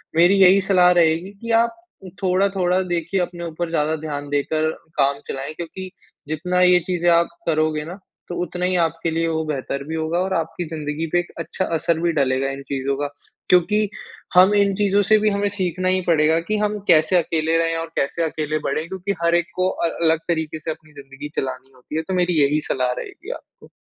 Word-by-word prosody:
मेरी 175 +4 +5
यही 190 +1 +7
सलाह 180 -2 +4
रहेगी 170 +2 +2
कि 230 - -4
आप, 230 +1 +3 0.5
थोड़ा-थोड़ा 185 -1 +2
देखिए 175 +2 -1
अपने 175 -1 -4
ऊपर 165 +1 -4
ज़्यादा 155 -1 0
ध्यान 145 -2 -5
देकर 155 +2 0 0.3
काम 140 0 +2
चलाएँ, 135 +3 -5
क्योंकि 175 +3 -7 0.4
जितना 180 +4 -1
ये 180 0 +6
चीज़े 175 -1 0
आप 170 0 +4 0.2
करोगे 155 -1 +1
ना 170 - -7 0.4
तो 175 - -4
उतना 180 +1 -3
ही 185 0 +1
आपके 165 -1 0
लिए 165 +1 0
वो 160 -1 -1
बेहतर 140 -1 -3
भी 160 - -3
होगा 160 +2 -1
और 190 +1 -1
आपकी 165 +1 -2
ज़िन्दगी 155 0 -3
पे 175 - +4
एक 175 - -5
अच्छा 185 +3 -3
असर 160 +1 0
भी 170 0 +1
डलेगा 135 -2 +1
इन 135 0 -6
चीज़ों 135 0 -2
का। 145 0 -1 0.4
क्योंकि, 205 +4 +3 0.5
हम 185 +3 +7
इन 200 -1 +3
चीज़ों 205 0 +2
से 215 +2 +5
भी 215 0 +2
हमें 200 0 0
सीखना 185 -2 -1
ही 185 0 +2
पड़ेगा 160 0 +3
कि 215 - +2
हम 210 0 -1
कैसे 165 +1 +4
अकेले 160 -1 +1
रहें 165 0 +1
और 165 0 -3
कैसे 155 +5 0
अकेले 155 -1 -2
बढ़ें, 160 +2 -2
क्योंकि 190 +2 -3
हर 170 0 +3
एक 175 -1 +2
को 185 0 +1
अ 170 - -1
अलग 160 -1 +3
तरीके 160 -2 -2
से 160 +1 -4
अपनी 155 -1 -11
ज़िन्दगी 140 +1 -9
चलानी 130 0 -4
होती 130 +4 -10
है। 160 - +1
तो 190 - -2
मेरी 180 -4 +2
यही 150 +2 +2
सलाह 125 -1 +1
रहेगी - - -8
आपको। - - -12
165 Hz, 205 wpm, -21 LUFS, 155-185 Hz, 0.5 s, यही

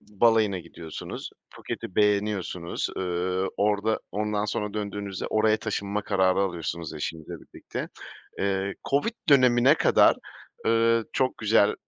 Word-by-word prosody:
balayına 105 -2 +2
gidiyorsunuz, 80 -2 -8 0.2
Phuket'i 90 - -7
beğeniyorsunuz, 100 -4 0
ııı, 90 +1 -1
orada 105 +1 +1
ondan 105 0 -1
sonra 105 0 -3
döndüğünüzde 100 -2 -4
oraya 110 0 +3
taşınma 105 -2 -3
kararı 95 -2 +2
alıyorsunuz 85 -3 -3
eşinizle 80 +1 -5
birlikte. - - -7 0.5
Eee, 100 0 -1 0.2
COVID 145 +12 +2 0.2
dönemine 130 0 +6
kadar, - - +5 0.5
ııı, 115 0 +3
çok 130 -1 0
güzel, 105 -1 +3
105 Hz, 110 wpm, -26 LUFS, 95-110 Hz, 0.5 s, dönemine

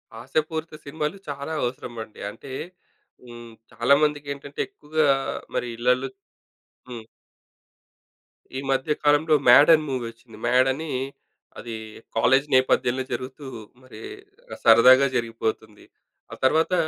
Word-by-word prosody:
హాస్యపూరిత 155 +7 -3
సినిమాలు 150 +4 -3
చాలా 140 +2 -5
అవసరమండి. 120 -3 -6
అంటే 135 +5 -12 0.7
హ్మ్. 120 -1 -11 0.2
చాలామందికేంటంటే 140 +2 0
ఎక్కువగా 155 0 -1 0.5
మరి - - -1
ఇళ్లళ్ళో 125 +2 +1 0.8
హ్మ్. 115 -2 -8 1.5
ఈ - - -1
మధ్య 135 +3 0
కాలంలో 150 +1 +4
'మ్యాడ్' 145 +6 +8
అని 155 - +3
మూవీ 130 -3 -2
ఒచ్చింది. 115 -2 -17
'మ్యాడని' 135 +5 +2 0.7
అది 115 -2 -6 0.4
కాలేజీ 135 +5 +3
నేపథ్యంలో 130 0 +2
జరుగుతూ 130 +4 -6 0.4
మరి 130 - -13 0.6
సరదాగా 130 +4 +7
జరిగిపోతుంది. 110 -2 -3 0.5
ఆ - - -6
తర్వాత 160 +7 +3
130 Hz, 100 wpm, -24 LUFS, 120-150 Hz, 1.5 s, మ్యాడ్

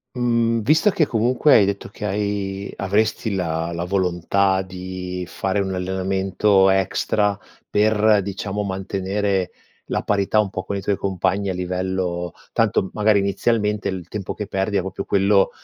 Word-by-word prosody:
Mhmm, 115 -2 +1
visto 155 - +4
che 160 -5 +2
comunque 125 +5 +3
hai 105 - +6
detto 100 0 -3
che 100 - -9
hai 100 -1 -2
avresti 105 +2 0
la 85 -2 -2
la 85 0 -3
volontà 95 +1 +1
di 90 -1 -6
fare 95 +3 -2
un 95 -1 -2
allenamento 95 +1 +2
extra 100 +2 +1 0.3
per 105 0 +3
diciamo, 100 +1 -3
mantenere 95 0 -2 0.3
la - - -2
parità 100 +1 +1
un 105 -2 +2
po' 95 - -5
con 100 - -3
i 100 - -4
tuoi 100 - 0
compagni 95 +1 -1
a 95 - -1
livello 90 -1 -2 0.2
tanto 95 - +1
magari 105 -1 +3
inizialmente 105 +1 0
il 95 -3 -4
tempo 100 -2 -5
che 105 - -5
perdi 100 +1 -1
è 95 - +2
proprio 95 +1 -5
quello 100 0 +3
100 Hz, 155 wpm, -22 LUFS, 95-105 Hz, 0.3 s, hai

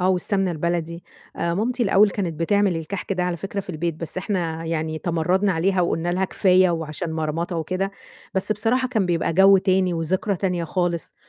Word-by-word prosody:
آه، 180 - +2
والسمنة 190 +1 +1
البلدي. 170 +1 -2 0.3
آآ 170 0 -1
مامتي 240 +6 0
الأول 205 -1 +4
كانت 185 -5 -3
بتعمل 200 +1 +2
الكحك 180 +5 -4
ده 180 - -1
على 180 -1 -1
فكرة 195 +3 -4
في 190 - -7
البيت، 170 0 -2
بس 165 +3 -5
إحنا 170 -5 -2
يعني 160 -1 -2
تمردنا 180 +4 +1
عليها 185 +3 +1
وقلنا 175 0 0
لها 190 +1 +1
كفاية 185 -1 +3
وعشان 160 0 -3
مرمطة 160 +2 -2
وكده. 185 +4 -2 0.4
بس 190 +3 +1
بصراحة 235 +5 0
كان 220 -7 0
بيبقى 170 -1 0
جو 195 +3 +7
تاني 185 -1 +1
وذكرى 185 +4 -1
تانية 180 -2 -1
خالص، 175 0 -2
180 Hz, 180 wpm, -23 LUFS, 165-195 Hz, 0.4 s, جو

